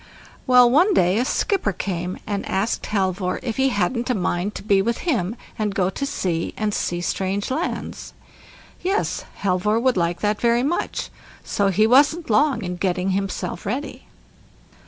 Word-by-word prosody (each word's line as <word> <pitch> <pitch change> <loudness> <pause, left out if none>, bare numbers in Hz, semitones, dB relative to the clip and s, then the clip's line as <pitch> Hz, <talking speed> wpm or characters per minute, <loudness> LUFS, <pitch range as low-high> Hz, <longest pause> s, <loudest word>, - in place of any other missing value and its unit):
Well, 250 -1 +7
one 345 - +4
day 180 +4 +3
a 250 - +1
skipper 350 - 0
came, 180 0 -3
and 200 -2 -2
asked 195 +4 -1
Halvor 190 -2 -1
if 230 -4 -3
he 270 0 +3
hadn't 235 +3 -1
a 250 - +2
mind 180 +1 -1
to - - -6
be 200 -2 +3
with 235 +3 -1
him, 230 - 0 0.2
and 210 -2 -1
go 185 -1 +1
to 275 - -3
sea, 170 -10 -2
and 215 -1 -1
see 175 -3 -1
strange 195 +5 -2
lands. 325 +7 -3 0.7
Yes, 390 +3 -1 0.2
Halvor 200 +3 +2
would 255 -2 +2
like 170 0 0
that 210 0 0
very 235 +1 +3
much; 320 +6 -2 0.3
so 200 - 0
he 195 +3 +3
wasn't 285 +5 +4
long 285 +3 +3
in 180 -1 -4
getting 185 +1 0
himself 195 -2 -3
ready. 255 +8 -4
210 Hz, 165 wpm, -22 LUFS, 185-250 Hz, 0.7 s, Well